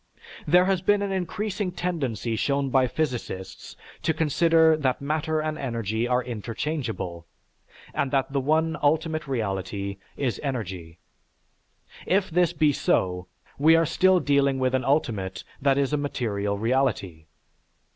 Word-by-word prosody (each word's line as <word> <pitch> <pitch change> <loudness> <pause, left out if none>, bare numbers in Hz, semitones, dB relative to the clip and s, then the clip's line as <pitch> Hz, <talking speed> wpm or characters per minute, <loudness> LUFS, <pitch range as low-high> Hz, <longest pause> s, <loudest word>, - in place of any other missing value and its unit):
There 180 +4 +5
has 190 -2 +1
been 205 +1 +2
an 200 - -2
increasing 190 +1 -2
tendency 135 - -2
shown 140 +3 0
by 130 -1 +4
physicists 120 -10 -4 0.3
to 160 0 0
consider 160 +1 +4
that 135 -4 0
matter 155 +2 -1
and 155 0 -3
energy 115 -3 -2
are 125 0 +1
interchangeable, 115 - -4 0.7
and 140 - 0
that 135 0 0
the 140 - +2
one 160 +4 +1
ultimate 155 +1 +1
reality 100 -5 -3 0.2
is 125 -8 -1
energy. 95 - -5 1.1
If 190 0 +1
this 175 0 +3
be 150 -2 +2
so, 90 -7 0 0.3
we 160 +3 +6
are 165 0 +4
still 185 +3 +3
dealing 140 -3 +2
with 130 -1 0
an 130 0 +1
ultimate 115 -10 0 0.2
that 135 0 +3
is 140 +1 +1
a - - +3
material 105 -8 -2
reality. 105 -9 -1
140 Hz, 135 wpm, -25 LUFS, 115-160 Hz, 1.1 s, we